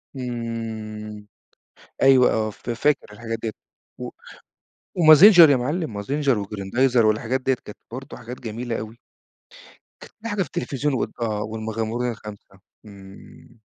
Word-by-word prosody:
إمم، 110 -4 -6 0.8
أيوه 135 -2 +6
آه، 110 -1 0
ف 120 - -8
فاكر 135 -1 0
الحاجات 115 +1 -5
دِيَّة، 110 -2 -2 0.5
و - - -5 0.9
ومازنچر 170 +1 +9
يا 140 - +5
مَعلِّم 145 - -2
مازنچر 135 +4 0
وجريندايزر 110 +5 +1
والحاجات 115 +4 0
دِيَّة، 130 0 +1
كانت 105 - -10
برضه 130 +2 -8
حاجات 120 +1 -9
جميلة 115 0 -4
أوي. 110 +2 -8 1.0
كانت - - -13
في 230 - -6
حاجة 205 -1 -1
في - - -11
التلفزيون، 135 +3 -2
وال 130 - -1
آه، 105 -2 -1
والمغامرون 110 +2 -3
الخمسة، 105 -3 -11 0.3
إمم. 100 +3 -15
115 Hz, 130 wpm, -23 LUFS, 110-130 Hz, 1.0 s, ومازنچر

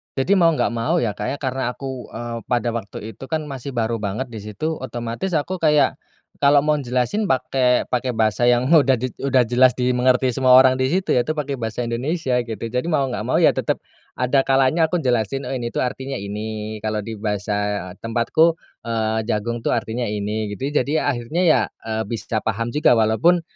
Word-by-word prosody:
Jadi 135 +9 +2
mau 165 -1 +6
nggak - - 0
mau, 115 0 0
ya, 110 - 0
Kak, 105 +1 -5
ya, - - -10
karena 130 0 -2
aku, 130 -3 -7
eee, 115 0 -5
pada 120 -1 0
waktu 110 -1 -6
itu, - - -11
kan, 160 -1 -2
masih 135 -2 -7
baru 115 0 0
banget 110 +5 -4
di 110 - -6
situ, 130 +10 -4
otomatis 120 +8 -4
aku 180 +5 -1
kayak 150 -2 +3 0.4
kalau 140 0 +5
mau 150 0 +1
jelasin 130 - -1
pakai 130 -4 +1
pakai 125 0 -1
bahasa 110 +2 +1
yang 120 +2 +3
udah 140 -5 +5
di 130 +1 -1 0.2
udah 130 -2 +4
jelas 125 +2 +4
dimengerti 125 +1 +2
semua 130 +1 +3
orang 130 0 +7
di 130 - +1
situ, 190 0 -1
ya, 120 -1 +2
itu 155 - -1
pakai 140 -2 -2
bahasa 115 +1 -3
Indonesia, 130 +3 -1
gitu. 115 0 -5
Jadi 125 +5 -2
mau 140 -4 +2
nggak 120 - -4
mau, - - +1
ya, - - +7
tetap - - -1 0.4
ada 130 +2 +2
kalanya 135 +5 +3
aku 180 - 0
jelasin 125 +1 0
ini, 120 -3 -3
tuh, - - -1
artinya 135 +2 -5
ini, 105 +2 -5
kalau 110 -1 -2
di 115 - -5
bahasa 105 -2 -2
tempatku, 120 +9 +2 0.3
eee, 110 -1 0
jagong, 115 +2 -1
tuh, - - +2
artinya 120 +2 -2
ini, 105 0 -3
gitu, 135 - -2
ya. 150 - +3
Jadi, 140 - -4
ya, - - 0
akhirnya, 120 +9 -2
ya, 155 -8 +5 0.2
eee, 110 0 -2
bisa 115 -1 -3
paham 115 +2 -2
juga 150 - +4
walaupun 140 +11 +3
125 Hz, 200 wpm, -21 LUFS, 110-135 Hz, 0.4 s, orang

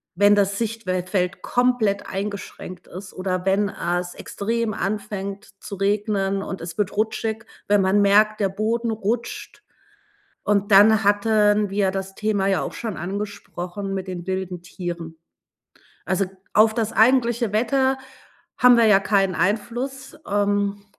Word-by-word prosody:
Wenn 205 +3 +5
das 200 -1 +1
Sichtwel 225 -5 -2
Feld 180 0 -2
komplett 245 -5 +1
eingeschränkt 195 -2 -6
ist 185 +1 -10
oder 185 -1 -3
wenn 200 +1 +2
es 175 -1 -3
extrem 225 +1 -3
anfängt 200 0 -4
zu - - -9
regnen 195 0 0
und 190 - -6
es 170 0 -7
wird 205 -2 -1
rutschig, 220 +1 -2 0.2
wenn 205 -1 +4
man 190 +2 +3
merkt, 210 +2 +4
der 195 -2 +1
Boden 225 +4 -1
rutscht. 235 - -4 0.8
Und 205 0 +1
dann 210 +1 +6
hatten 210 0 +3
wir 195 -1 +1
das 195 0 -5
Thema 210 -2 0
ja 195 -2 +1
auch - - -5
schon 220 -7 -5
angesprochen 195 0 -5
mit 190 0 -4
den 180 -1 -6
wilden 185 -2 -3
Tieren. 175 -2 -6 0.9
Also, 190 +3 +1 0.3
auf 220 +1 +5
das 225 -1 -1
eigentliche 235 -2 +3
Wetter 265 +4 +2 0.6
haben 250 -1 +7
wir 235 -1 +5
ja 210 -3 +6
keinen 195 -2 +1
Einfluss. 240 +8 -2
Ähm, 205 0 0
205 Hz, 140 wpm, -23 LUFS, 190-220 Hz, 0.9 s, haben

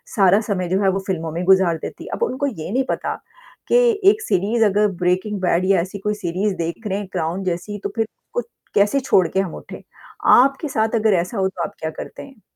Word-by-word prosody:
सारा 195 +1 +5
समय 185 -3 -1
जो 190 +2 +1
है 195 - +4
वो 195 - -1
फ़िल्मों 165 -4 -2
में 170 +3 -3
गुज़ार 190 -3 +4
देती - - -7
है - - -8
अब - - -1
उनको 285 - -1
ये 185 - -5
नहीं 260 +3 +1
पता - - -2 0.5
कि - - +2 0.3
एक 430 +2 +1
सीरीज़ 225 - +1
अगर 210 +1 +3
ब्रेकिंग 185 +3 0
बैड 180 0 +2
या 190 -3 +3
ऐसी 190 +3 -6
कोई 210 +2 -1
सीरीज़ 190 +1 -2
देख 170 +6 -4
रहे 195 0 -1
हैं, 200 - -6
क्राउन 175 +2 -2
जैसी 185 +3 -3
तो 200 - -2
फिर 225 -1 0 0.3
कोई 485 - -1 0.3
कैसे 205 +7 +3
छोड़ 190 -9 +3
के 190 - -1
हम 185 - -5
उठें, - - -10 0.4
आपके 275 +4 +5
साथ 220 -1 0
अगर 220 -2 +3
ऐसा 200 +5 -6
हो 190 -1 +2
तो 180 -3 -5
आप - - -5
क्या 160 - -3
करते - - -8
हैं? 270 -6 -15
195 Hz, 230 wpm, -21 LUFS, 180-220 Hz, 0.5 s, सारा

